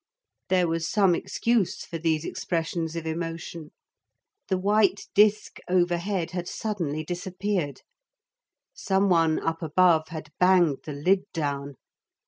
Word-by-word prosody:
There 180 -2 +3
was 165 0 -1
some 195 -4 +4
excuse 230 +2 0
for 165 - -6
these 160 -1 0
expressions 165 -1 -3
of 165 -1 -4
emotion. 165 -1 -5 0.8
The 190 - +1
white 200 +1 +2
disk 210 +1 +3
overhead 175 0 0
had 175 -1 -4
suddenly 170 -10 -3
disappeared. 180 -2 -3 0.9
Some 195 - +1
one 165 -3 +3
up 165 0 -2
above 160 0 +3
had 155 -1 -8
banged 180 -6 +4
the 150 - -5
lid 185 +7 +1
down. 140 -3 -3
175 Hz, 120 wpm, -26 LUFS, 160-190 Hz, 0.9 s, some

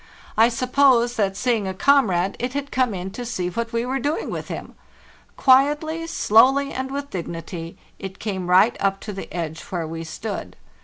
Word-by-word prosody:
I 225 +2 +5
suppose 245 0 +3
that, 195 -2 0
seeing 230 -5 0
a 190 - -4
comrade, 195 -8 +3
it 250 +1 -3
had 280 0 -4
come 250 -5 +1
in 185 +1 -5
to 245 - -6
see 185 -7 -3
what 230 +4 -3
we 230 +1 -1
were 265 +2 -1
doing 290 +5 -2
with - - -5
him. - - -7 0.6
Quietly, 295 +5 +3
slowly, 275 0 +4
and 260 0 -3
with 280 +1 -5
dignity 165 -1 -6 0.2
it 195 0 -7
came 190 -4 -4
right 190 +6 +5
up 195 0 0
to 210 - -6
the 195 - -8
edge 165 -2 -4
where 175 -3 -3
we 165 +1 -6
stood. 205 +6 -6
225 Hz, 185 wpm, -22 LUFS, 185-265 Hz, 0.6 s, I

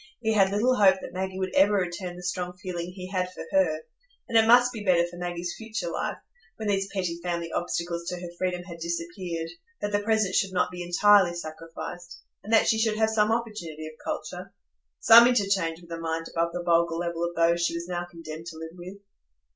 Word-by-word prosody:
He 220 -2 0
had 195 -3 +4
little 225 +6 +2
hope 195 -2 +6
that - - -9
Maggie 190 0 -3
would 190 -1 -3
ever 200 +2 +5
return 180 -1 -2
the 180 - -10
strong 180 0 -3
feeling 180 -2 -5
he 185 0 -8
had 185 -1 -1
for - - -8
her; 160 -5 +2 0.4
and 230 - -5
it 225 0 +6
must 245 +1 +6
be 220 -3 -6
better 175 -3 +4
for 175 0 -10
Maggie's 175 0 -4
future 220 -6 -4
life, - - -3 0.4
when 220 - -5
these 195 -1 0
petty 180 -4 -2
family 170 -1 -3
obstacles 170 0 -3
to 180 - -3
her 175 -1 -7
freedom 180 0 -2
had 170 -2 -10
disappeared, 170 0 -4 0.3
that 205 - -3
the 205 - +2
present 215 -2 +1
should 195 -1 +1
not 180 - +1
be 180 0 -7
entirely 175 +1 +4
sacrificed, 165 +2 -8 0.2
and 215 - -7
that 225 - +5
she 220 - +3
should 220 -1 +1
have 220 0 +2
some 215 0 +2
opportunity 210 -10 -3
of 155 - -8
culture,—some 65 - +3
interchange 195 -8 +1
with 170 -1 -16
a 165 - -4
mind 165 0 -3
above 170 0 0
the 175 0 -4
vulgar 170 -1 +2
level 170 0 -2
of 170 0 -2
those 170 +1 +3
she 170 - 0
was 170 +1 -4
now 175 -1 -2
condemned 165 -1 -9
to 165 -1 -8
live 160 0 -7
with. 180 +2 -10
175 Hz, 210 wpm, -27 LUFS, 170-200 Hz, 0.4 s, hope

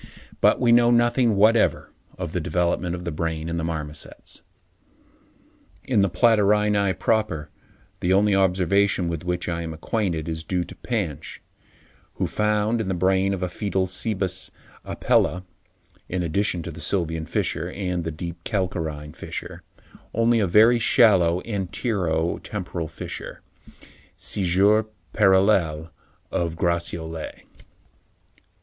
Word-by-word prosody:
But - - +4
we 120 -2 +3
know 120 0 +6
nothing 120 -1 +3
whatever 110 +3 +3 0.3
of 90 -3 -4
the 90 - -1
development 90 +1 0
of 90 0 -8
the 85 - -2
brain 80 0 -3
in 85 0 -3
the 85 - -2
marmosets. 75 -2 -6 1.4
In 115 -6 +2
the 100 - +2
Platyrrhini 105 -1 +3
proper, 105 -9 -1 0.5
the 90 - 0
only 100 +2 +4
observation 95 -1 +2
with 85 -1 -4
which 90 0 -2
I 85 -1 -2
am 80 -1 -5
acquainted 85 -3 -2
is 80 -1 -4
due 90 +1 -1
to - - -11
Pansch, 100 - -4 0.8
who - - -1
found 105 +2 0
in 105 - -4
the 95 - -1
brain 95 +2 +2
of 95 -1 -3
a - - 0
foetal 95 0 -1
Cebus 95 -1 -2 0.3
Apella, 90 +2 +1 0.7
in 90 0 -2
addition 85 +1 0
to 85 - -6
the 80 0 -8
sylvian 80 -2 -1
fissure - - -1
and 90 -3 -3
the 80 - -3
deep 85 +2 -7
calcarine 80 -7 -3
fissure, - - -7 0.5
only 115 +1 +3
a 100 - +2
very 110 +6 +5
shallow 95 -8 +4
antero 95 -5 -1
temporal 90 -5 -5
fissure 80 - -7 0.8
(scissure 100 +3 +2 0.3
parallele 95 -6 +3 0.4
of 85 -2 -1
Gratiolet). 85 -1 -3
90 Hz, 130 wpm, -24 LUFS, 85-105 Hz, 1.4 s, know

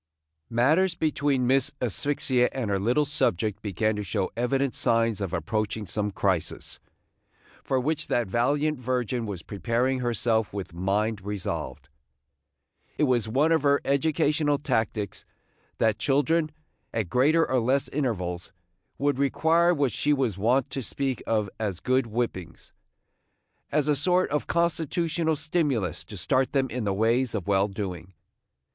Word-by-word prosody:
MATTERS 155 +10 +3
between 145 -5 0
Miss 130 +1 +3
Asphyxia 125 +1 0
and 120 -6 -2
her 100 - +1
little 125 +9 +2
subject 110 - 0
began 110 +2 0
to 105 - -3
show 100 -1 -2
evident 135 +3 0
signs 115 -2 +1
of 95 -4 -2
approaching 110 +2 -2
some 105 +3 -1
crisis, 95 -3 -2 0.8
for 130 - 0
which 150 +3 -1
that 120 - +1
valiant 140 +8 0
virgin 125 -2 -1
was 95 -5 -6
preparing 115 +7 -1
herself 115 -3 0
with 95 -3 -5
mind 100 +4 -1
resolved. 100 -7 -4 1.1
It - - +1
was 125 -6 +2
one 140 +8 +2
of 160 - +3
her 140 0 +3
educational 150 +1 +2
tactics 110 -6 -2 0.5
that 110 -2 +1
children, 155 +4 +2 0.4
at 110 -4 -2
greater 150 - +3
or 130 - +2
less 130 +4 +1
intervals, 95 -12 -2 0.5
would 140 -1 0
require 165 +5 +3
what 140 -7 +1
she 150 - +1
was 130 -8 0
wont 120 +7 +1
to 135 - -3
speak 130 +2 -2
of 110 -2 +1
as 100 -5 -2
good 130 -1 +1
whippings, 105 -7 -4 1.0
as 150 -1 +1
a 150 - +3
sort 180 +6 +2
of 150 - -1
constitutional 165 -1 0
stimulus 145 - -1
to 105 - -9
start 130 +8 +1
them 135 -3 +1
in 120 -1 -3
the 100 - +1
ways 115 +4 +1
of 100 -3 -4
well 100 0 +3
doing. 95 -3 -6
125 Hz, 145 wpm, -26 LUFS, 105-145 Hz, 1.1 s, MATTERS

